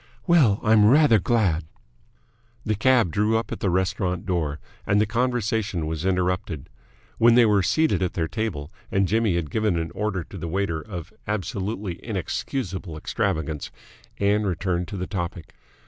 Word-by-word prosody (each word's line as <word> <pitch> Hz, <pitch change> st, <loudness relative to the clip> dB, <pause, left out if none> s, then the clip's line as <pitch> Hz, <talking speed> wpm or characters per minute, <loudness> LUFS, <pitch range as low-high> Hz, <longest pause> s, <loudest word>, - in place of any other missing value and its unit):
"Well, 145 Hz, -, +4 dB
I'm 110 Hz, -1 st, +5 dB
rather 140 Hz, -4 st, +6 dB
glad." 95 Hz, -6 st, +1 dB, 1.0 s
The 110 Hz, -, +1 dB
cab 115 Hz, -3 st, +3 dB
drew 105 Hz, +5 st, +2 dB
up 115 Hz, -, -4 dB
at -, -, -4 dB
the 100 Hz, -, 0 dB
restaurant 90 Hz, +1 st, -1 dB
door, 80 Hz, -6 st, -1 dB, 0.2 s
and 100 Hz, -, +2 dB
the 105 Hz, -, +4 dB
conversation 110 Hz, -6 st, -1 dB
was 80 Hz, +3 st, -2 dB
interrupted. 90 Hz, -5 st, -1 dB, 0.5 s
When 115 Hz, 0 st, +6 dB
they 120 Hz, -1 st, +7 dB
were 105 Hz, -2 st, +4 dB
seated 155 Hz, -, +2 dB
at 90 Hz, -, 0 dB
their 80 Hz, -1 st, -1 dB
table 90 Hz, -8 st, -4 dB, 0.2 s
and 100 Hz, -1 st, +2 dB
Jimmy 110 Hz, -2 st, +2 dB
had 80 Hz, -4 st, -2 dB
given 110 Hz, -5 st, +1 dB
an 80 Hz, 0 st, -3 dB
order 105 Hz, -4 st, -2 dB
to 95 Hz, -, -10 dB
the 85 Hz, -, -4 dB
waiter 85 Hz, -2 st, -1 dB
of 90 Hz, +1 st, -8 dB
absolutely 100 Hz, -2 st, -3 dB
inexcusable 95 Hz, -, -4 dB
extravagance, 80 Hz, -1 st, -2 dB, 0.5 s
Ann 100 Hz, +1 st, +2 dB
returned 90 Hz, -2 st, -1 dB
to 105 Hz, -, -6 dB
the 90 Hz, -, -3 dB
topic. 85 Hz, -4 st, -5 dB
95 Hz, 160 wpm, -24 LUFS, 85-110 Hz, 1.0 s, they